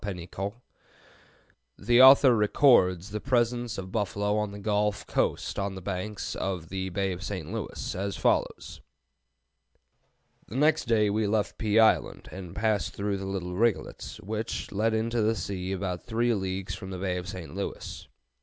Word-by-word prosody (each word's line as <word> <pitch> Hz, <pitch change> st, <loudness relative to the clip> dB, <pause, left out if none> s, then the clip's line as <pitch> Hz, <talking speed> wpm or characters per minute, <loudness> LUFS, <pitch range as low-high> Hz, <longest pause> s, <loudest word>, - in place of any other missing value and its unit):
Penicaut" 95 Hz, +1 st, -5 dB, 1.2 s
(1698), -, -, -16 dB
the 120 Hz, +1 st, +6 dB
author 130 Hz, -1 st, +8 dB
records 105 Hz, -5 st, +4 dB
the 105 Hz, 0 st, -4 dB
presence 120 Hz, -2 st, 0 dB
of 95 Hz, -, -4 dB
the 95 Hz, -, -12 dB
buffalo 105 Hz, 0 st, 0 dB
on 105 Hz, -1 st, 0 dB
the 100 Hz, -, -8 dB
Gulf 105 Hz, 0 st, 0 dB
coast -, -, -1 dB
on 100 Hz, 0 st, -2 dB
the -, -, -6 dB
banks 100 Hz, +2 st, -4 dB
of 90 Hz, -4 st, -3 dB
the 95 Hz, 0 st, -3 dB
Bay 95 Hz, 0 st, -1 dB
St. 95 Hz, -2 st, -5 dB
Louis, 115 Hz, -4 st, -4 dB
as 100 Hz, +2 st, -3 dB
follows: -, -, 0 dB, 1.7 s
"The 110 Hz, -, -9 dB
next 150 Hz, +3 st, +3 dB
day 105 Hz, -3 st, +3 dB
we 105 Hz, 0 st, +1 dB
left 105 Hz, 0 st, -1 dB
Pea 110 Hz, -1 st, +1 dB
Island, 110 Hz, -1 st, +3 dB
and 90 Hz, -1 st, -8 dB
passed 105 Hz, -1 st, 0 dB
through 100 Hz, 0 st, -1 dB
the 95 Hz, 0 st, -5 dB
Little 90 Hz, -2 st, -3 dB
Rigolets, 115 Hz, +2 st, -1 dB
which 110 Hz, +3 st, -4 dB
led 110 Hz, +2 st, +1 dB
into 115 Hz, +1 st, 0 dB
the 110 Hz, +1 st, +2 dB
sea 95 Hz, -3 st, -4 dB
about 90 Hz, -2 st, -3 dB
three 120 Hz, 0 st, +1 dB
leagues 95 Hz, -2 st, -3 dB
from 95 Hz, +1 st, -7 dB
the 95 Hz, -, -5 dB
Bay 90 Hz, -1 st, -2 dB
of 90 Hz, +1 st, -5 dB
St. 90 Hz, -4 st, -7 dB
Louis. 100 Hz, +1 st, -6 dB
100 Hz, 165 wpm, -28 LUFS, 95-110 Hz, 1.7 s, author